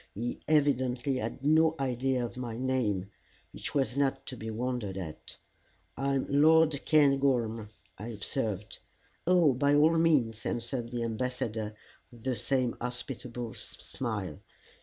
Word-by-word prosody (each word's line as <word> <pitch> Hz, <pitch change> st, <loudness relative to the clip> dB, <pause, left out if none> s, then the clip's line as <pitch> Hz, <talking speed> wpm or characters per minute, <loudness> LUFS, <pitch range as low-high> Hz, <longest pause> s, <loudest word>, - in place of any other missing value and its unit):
He 120 Hz, +4 st, -3 dB
evidently 135 Hz, -3 st, +2 dB
had 120 Hz, +3 st, -4 dB
no 160 Hz, +1 st, +5 dB
idea 130 Hz, -1 st, 0 dB
of 120 Hz, -, -7 dB
my 120 Hz, -3 st, -5 dB
name, 115 Hz, -7 st, 0 dB, 0.4 s
which -, -, -5 dB
was 135 Hz, -4 st, +1 dB
not 140 Hz, -1 st, 0 dB
to 130 Hz, -, -6 dB
be 110 Hz, -1 st, -6 dB
wondered 115 Hz, -4 st, -3 dB
at. 80 Hz, -5 st, -7 dB, 0.6 s
"I 140 Hz, 0 st, 0 dB
am 135 Hz, -, 0 dB
Lord 155 Hz, 0 st, +4 dB
Cairngorm," 135 Hz, -7 st, +3 dB, 0.3 s
I 105 Hz, -, -6 dB
observed. 105 Hz, -2 st, -3 dB, 0.5 s
"Oh 175 Hz, -6 st, +5 dB
by 140 Hz, +3 st, +3 dB
all 160 Hz, +3 st, +5 dB
means," 130 Hz, -10 st, +2 dB
answered 120 Hz, 0 st, -2 dB
the 120 Hz, -1 st, -2 dB
Ambassador 110 Hz, -2 st, -2 dB, 0.4 s
with 120 Hz, -2 st, -15 dB
the 130 Hz, -1 st, 0 dB
same 125 Hz, +2 st, 0 dB
hospitable 120 Hz, -1 st, -5 dB
smile. -, -, -5 dB
125 Hz, 135 wpm, -30 LUFS, 115-140 Hz, 0.6 s, no